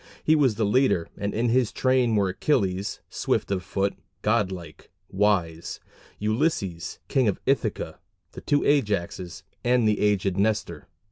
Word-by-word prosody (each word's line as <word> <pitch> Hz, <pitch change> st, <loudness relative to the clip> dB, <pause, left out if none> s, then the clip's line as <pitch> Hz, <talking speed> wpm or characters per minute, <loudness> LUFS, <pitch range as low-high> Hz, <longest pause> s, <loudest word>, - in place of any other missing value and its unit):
He 155 Hz, -, +4 dB
was 135 Hz, -7 st, +3 dB
the 110 Hz, 0 st, 0 dB
leader, 105 Hz, -6 st, +2 dB
and 100 Hz, 0 st, -3 dB
in 115 Hz, +3 st, 0 dB
his 125 Hz, -1 st, +2 dB
train 130 Hz, -3 st, +2 dB
were 100 Hz, -2 st, +2 dB
Achilles, 95 Hz, -3 st, 0 dB
"swift -, -, -1 dB
of 95 Hz, -2 st, 0 dB
foot"; 100 Hz, +2 st, -1 dB, 0.3 s
"god 105 Hz, -3 st, +2 dB
like, 85 Hz, -5 st, -9 dB, 0.2 s
wise" 95 Hz, -5 st, 0 dB, 0.4 s
Ulysses, 105 Hz, -, -1 dB
King 130 Hz, -5 st, +2 dB
of 100 Hz, -, 0 dB
Ithaca, 110 Hz, -, -1 dB, 0.3 s
the -, -, -9 dB
two 145 Hz, -1 st, +2 dB
Ajaxes, 100 Hz, -, 0 dB, 0.2 s
and 120 Hz, -2 st, +3 dB
the 105 Hz, -, +2 dB
aged 100 Hz, -2 st, +1 dB
Nestor. 100 Hz, -6 st, -1 dB
105 Hz, 145 wpm, -25 LUFS, 95-120 Hz, 0.4 s, He